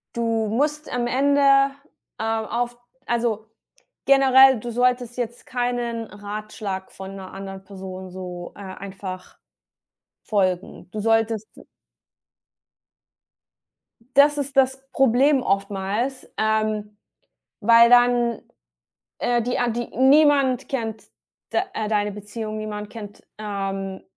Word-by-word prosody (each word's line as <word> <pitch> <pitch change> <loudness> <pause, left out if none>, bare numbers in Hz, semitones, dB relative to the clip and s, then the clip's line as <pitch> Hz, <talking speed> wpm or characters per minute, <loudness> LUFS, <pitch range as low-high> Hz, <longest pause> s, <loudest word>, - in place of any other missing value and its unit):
du 230 -2 0
musst 295 +7 -1
am 245 -1 -1
Ende, 280 +3 +2 0.8
ähm, 220 0 -1
auf 240 +1 -2 0.3
also 230 -2 -1 0.6
generell, 265 -2 +6
du 240 +2 -5
solltest 245 0 +1
jetzt 240 -1 -5
keinen 245 -2 -2
Ratschlag 205 -2 -6
von 190 0 -8
'ner 190 -1 -9
anderen 195 0 -8
Person 190 -1 -8
so, 180 -1 -7
äh, - - -13
einfach 190 -1 -8 0.9
folgen. 185 -3 -1
Du 215 - -5
solltest 225 0 +1
d - - -15 2.5
Das 290 +1 +6
ist 280 0 -3
das 265 0 +3
Problem 265 +1 +3
oftmals, 200 +6 -2
ähm, 215 -1 0 0.6
weil 230 +2 +7
dann, 245 -1 +4 0.8
äh, 240 -1 +1
die 245 +2 -1
an 240 -1 +1
die 240 +1 -3
niemand 275 -1 +4
kennt 225 -5 -3 0.5
d - - +2 0.2
äh, 215 -1 -2
deine 210 -1 0
Beziehung, 215 +1 -6
niemand 210 -1 -5
kennt, 205 -3 -10 0.2
ähm 195 -2 -4
225 Hz, 110 wpm, -23 LUFS, 205-245 Hz, 2.5 s, weil